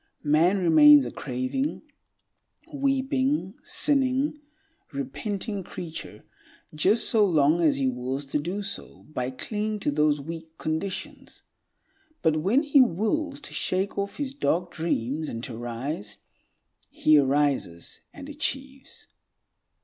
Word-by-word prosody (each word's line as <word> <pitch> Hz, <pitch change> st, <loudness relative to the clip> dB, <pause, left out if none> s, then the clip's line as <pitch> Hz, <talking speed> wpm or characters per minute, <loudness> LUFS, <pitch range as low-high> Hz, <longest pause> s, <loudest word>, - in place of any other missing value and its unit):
Man 160 Hz, +6 st, +3 dB
remains 150 Hz, -6 st, +7 dB
a 120 Hz, -, -5 dB
craving, 130 Hz, -, -3 dB, 0.9 s
weeping, 270 Hz, -4 st, 0 dB
sinning, 290 Hz, -4 st, +1 dB, 0.5 s
repenting 195 Hz, -, -4 dB
creature 170 Hz, -2 st, -8 dB, 0.5 s
just 195 Hz, +9 st, +3 dB
so 220 Hz, -2 st, +4 dB
long 160 Hz, -3 st, +3 dB
as 155 Hz, -4 st, +3 dB
he 135 Hz, -1 st, +1 dB
wills 130 Hz, +2 st, -3 dB
to -, -, +1 dB
do 180 Hz, +7 st, -3 dB
so 200 Hz, -, -6 dB
by 125 Hz, -2 st, -2 dB
clinging 210 Hz, -, -3 dB
to 145 Hz, -, 0 dB
those 150 Hz, 0 st, +2 dB
weak 160 Hz, +2 st, -8 dB
conditions. 160 Hz, +5 st, -5 dB, 0.8 s
But 160 Hz, -1 st, +3 dB
when 205 Hz, -, +2 dB
he 285 Hz, -2 st, +5 dB
wills 270 Hz, -, 0 dB
to -, -, -9 dB
shake 190 Hz, +2 st, -1 dB
off 200 Hz, 0 st, -3 dB
his 280 Hz, -2 st, -3 dB
dark 180 Hz, -, 0 dB
dreams 155 Hz, -2 st, -2 dB
and 115 Hz, 0 st, -6 dB
to 125 Hz, -, -5 dB
rise, 120 Hz, -1 st, -5 dB, 0.7 s
he 155 Hz, -1 st, +4 dB
arises 135 Hz, -11 st, 0 dB
and 280 Hz, -1 st, -10 dB
achieves. 275 Hz, -2 st, -4 dB
170 Hz, 120 wpm, -26 LUFS, -, 0.9 s, remains